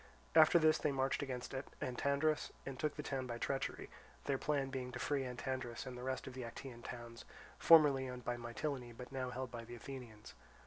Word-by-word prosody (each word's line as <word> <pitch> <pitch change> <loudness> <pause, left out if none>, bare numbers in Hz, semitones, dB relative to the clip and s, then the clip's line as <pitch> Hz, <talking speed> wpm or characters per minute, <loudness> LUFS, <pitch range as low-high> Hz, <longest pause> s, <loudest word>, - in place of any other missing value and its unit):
After 155 +2 +8
this 155 -1 +5
they 150 - +1
marched 135 0 +1
against 130 -3 -4 0.3
Antandrus 140 +4 +1
and 135 -2 -5
took 150 -2 0
the - - -4
town 130 -2 -2
by 120 -1 -3
treachery, 135 +3 -2 0.4
their 135 -2 +1
plan 140 -2 0
being 130 -2 -3
to - - -3
free 140 +2 0
Antandrus 125 -1 -3
and 130 - -6
the 125 - -7
rest 130 +1 -2
of 130 - -7
the 130 - -5
Actaean 120 +1 -7
towns, 120 -1 -7 0.4
formerly 145 -5 +7
owned 125 -1 -7
by 120 - 0
Mitylene 120 +1 -4
but 125 - -8
now 130 -1 -2
held 125 0 -4
by 115 -1 -5
the 120 +1 -8
Athenians. 120 -4 -9
130 Hz, 195 wpm, -38 LUFS, 120-140 Hz, 0.4 s, After